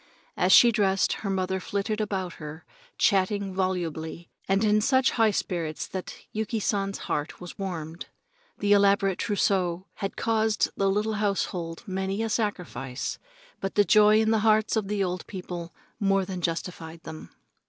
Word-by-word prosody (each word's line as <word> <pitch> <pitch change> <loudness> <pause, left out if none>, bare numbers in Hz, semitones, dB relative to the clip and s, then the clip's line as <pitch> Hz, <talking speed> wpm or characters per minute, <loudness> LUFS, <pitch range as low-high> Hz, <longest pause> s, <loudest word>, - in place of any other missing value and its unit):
As - - +2
she 240 - +8
dressed, 195 -3 +2
her 200 - -3
mother 190 0 0
flitted 205 +3 -2
about 190 -4 -2
her, 155 +2 -8 0.3
chatting 195 -1 +2
volubly 170 -3 -3 0.2
and 195 +2 +2
in 215 0 +4
such 260 +3 +3
high 225 -2 +3
spirits 170 -6 -2
that 185 -1 -6 0.2
Yuki 220 +1 -2
San's 195 -1 -1
heart 150 +2 -3
was 180 +1 -10
warmed. 170 -4 -5 0.5
The 205 0 +3
elaborate 200 -1 +3
trousseau 190 -4 0
had 195 -2 -4
caused 220 -2 +1
the 195 0 +2
little 210 +3 0
household 180 -4 -2
many 190 +1 -2
a 225 - -1
sacrifice, 175 - -3 0.4
but 195 - -4
the 205 - +5
joy 215 0 +6
in 220 0 +2
the 220 - +3
hearts 215 0 +3
of 215 -3 0
the 205 -1 0
old 180 -1 -3
people 175 -3 -6 0.3
more 195 -1 +2
than 185 -1 -5
justified 165 -1 -4
them. 160 0 -9
195 Hz, 155 wpm, -27 LUFS, 180-210 Hz, 0.5 s, she